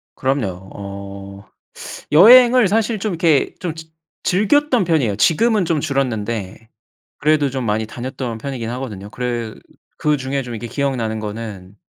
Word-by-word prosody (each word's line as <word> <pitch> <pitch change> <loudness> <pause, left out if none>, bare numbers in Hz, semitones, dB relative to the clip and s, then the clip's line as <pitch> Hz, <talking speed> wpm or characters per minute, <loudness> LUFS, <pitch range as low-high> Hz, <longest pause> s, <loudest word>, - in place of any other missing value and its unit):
그럼요. 100 -9 -2
어. 100 0 -9 0.7
여행을 240 +6 +8
사실 220 +1 0
좀 210 -1 -2
이렇게 165 -4 +2
좀 175 -3 -3
즈 160 0 -9 0.4
즐겼던 240 +5 +2
편이에요. 140 - +1
지금은 210 - +3
좀 160 -2 0
줄었는데 115 -6 -3 0.5
그래도 150 -1 +2
좀 130 -1 -4
많이 110 0 -1
다녔던 125 0 -5
편이긴 120 -1 -5
하거든요. 105 -6 -6
그래 120 -2 -4 0.4
그중에 140 -2 -1
좀 120 -2 -7
이렇게 110 +2 -6
기억나는 120 -5 -2
거는 105 -3 -7
130 Hz, 310 characters per minute, -19 LUFS, 110-160 Hz, 0.7 s, 여행을